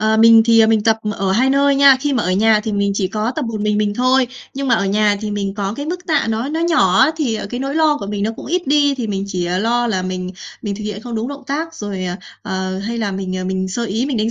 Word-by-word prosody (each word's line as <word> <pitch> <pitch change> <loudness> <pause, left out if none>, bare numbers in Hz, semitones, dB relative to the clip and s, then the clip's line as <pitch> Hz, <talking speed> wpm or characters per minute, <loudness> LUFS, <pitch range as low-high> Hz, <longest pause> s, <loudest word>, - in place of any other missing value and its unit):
Ờ, 220 0 +2
mình 225 0 +7
thì, 230 -1 +5
à, 220 - +6
mình 220 -1 +2
tập 220 0 +3 0.2
ở 195 -1 -1
2 255 +6 +2
nơi 280 +1 +3
nha, 275 -1 +7
khi 290 0 -1
mà 240 - +1
ở 180 - -1
nhà 215 +2 +3
thì 215 0 -4
mình 200 0 0
chỉ 195 -2 -1
có 215 +4 -2
tập - - -1
một 225 -2 -4
mình 210 0 0
mình 210 -1 0
thôi, 255 +2 +2 0.3
nhưng 275 0 -3
mà 235 - +4
ở 200 - 0
nhà 205 +1 +2
thì 215 -1 -4
mình 200 -1 -3
có 200 0 -3
cái 285 +1 -5
mức 360 +2 -5
tạ 315 - +1
nó 225 +4 -1
nó 320 +2 -2
nhỏ 310 - +3
á, 265 - +5
thì 250 -9 -1
cái 245 - -4
nỗi 275 +2 -3
lo 315 -2 +3
của 200 - -6
mình 205 0 -3
nó 220 - 0
cũng - - -9
ít 350 +4 0
đi, 285 0 +3
thì 245 -4 -4
mình 195 -1 -2
chỉ, 185 -3 -3
à, 180 +1 -1
lo 240 +3 +1
là 190 -5 -1
mình 185 0 -4 0.3
mình 205 -2 -3
thực 215 - -7
hiện 210 -1 -5
không 240 0 -6
đúng 225 +2 -2
động 280 0 -8
tác, 320 +4 -3
rồi, 200 -7 -5
à, 180 0 -3 0.3
ờ, 190 -2 -3
hay 230 +4 -4
là 205 -3 -2
mình, 190 -1 -4
à, 185 - -4
mình 190 0 -2
sơ 235 +5 -3
ý 230 +4 -1
mình 275 - -2
đánh 220 +1 0
220 Hz, 305 wpm, -18 LUFS, 200-265 Hz, 0.3 s, mình